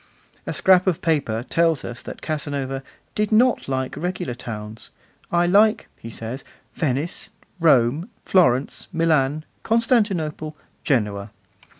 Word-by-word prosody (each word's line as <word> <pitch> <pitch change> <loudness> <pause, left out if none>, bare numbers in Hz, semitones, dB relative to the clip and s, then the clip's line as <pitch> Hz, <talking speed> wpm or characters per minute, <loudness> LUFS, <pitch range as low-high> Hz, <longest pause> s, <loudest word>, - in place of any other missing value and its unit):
A - - -1
scrap 185 0 +4
of 180 -4 +2
paper 140 -9 0
tells 165 -4 +2
us 120 0 -6
that - - -9
Casanova 140 -3 -3 0.3
'did 210 0 0
not 240 +3 +3
like 130 -1 -2
regular 175 -3 -3
towns.' 110 -2 -8 0.4
'I 175 0 +3
like,' 210 +5 +4
he 115 - -10
says, 115 +4 -6 0.3
'Venice, 150 +1 -1 0.3
Rome, 150 - +3 0.2
Florence, 140 -8 +2
Milan, 155 -3 +1 0.2
Constantinople, 195 -10 +1 0.3
Genoa. 105 -6 0
155 Hz, 115 wpm, -23 LUFS, 130-180 Hz, 0.4 s, scrap